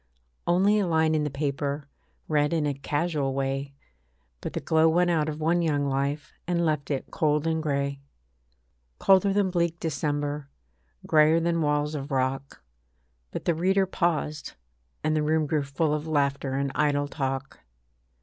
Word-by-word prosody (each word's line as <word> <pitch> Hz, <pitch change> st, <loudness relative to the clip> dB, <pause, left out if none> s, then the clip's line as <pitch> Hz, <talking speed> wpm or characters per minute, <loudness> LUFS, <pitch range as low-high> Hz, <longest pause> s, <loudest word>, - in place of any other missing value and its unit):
Only 195 Hz, +5 st, +4 dB
a 195 Hz, -, +1 dB
line 160 Hz, -1 st, +2 dB
in 155 Hz, -1 st, +1 dB
the -, -, -1 dB
paper, 140 Hz, 0 st, -2 dB, 0.4 s
Read 150 Hz, 0 st, +2 dB
in 160 Hz, -3 st, +1 dB
a 145 Hz, -, 0 dB
casual 145 Hz, 0 st, -1 dB
way, 135 Hz, +1 st, -2 dB, 0.7 s
But -, -, -5 dB
the -, -, -2 dB
glow 160 Hz, 0 st, +3 dB
went 175 Hz, +2 st, +3 dB
out 155 Hz, -2 st, +1 dB
of 155 Hz, 0 st, -5 dB
one 165 Hz, +3 st, +2 dB
young 145 Hz, -4 st, +1 dB
life, 140 Hz, +2 st, -2 dB
And 170 Hz, -1 st, +1 dB
left 150 Hz, -3 st, -1 dB
it 140 Hz, -3 st, -3 dB
cold 150 Hz, -1 st, +1 dB
and 160 Hz, -1 st, 0 dB
grey. 140 Hz, -2 st, -1 dB, 1.0 s
Colder 195 Hz, +1 st, +4 dB
than 195 Hz, -1 st, +1 dB
bleak 170 Hz, -1 st, 0 dB
December, 145 Hz, -2 st, -2 dB, 0.6 s
Greyer 155 Hz, +1 st, +5 dB
than 170 Hz, 0 st, 0 dB
walls 150 Hz, 0 st, +1 dB
of 140 Hz, -1 st, -5 dB
rock, 135 Hz, 0 st, -2 dB, 0.7 s
But -, -, -6 dB
the 170 Hz, -, +3 dB
reader 190 Hz, +4 st, +2 dB
paused, 155 Hz, -4 st, -1 dB, 0.5 s
and 155 Hz, 0 st, +1 dB
the 155 Hz, -, +2 dB
room 155 Hz, +1 st, +2 dB
grew 150 Hz, 0 st, 0 dB
full 145 Hz, +2 st, -1 dB
Of 150 Hz, +1 st, -3 dB
laughter 140 Hz, -3 st, 0 dB
and 140 Hz, 0 st, -1 dB
idle 145 Hz, -1 st, +1 dB
talk. 135 Hz, -1 st, -4 dB
150 Hz, 160 wpm, -26 LUFS, 140-165 Hz, 1.0 s, Greyer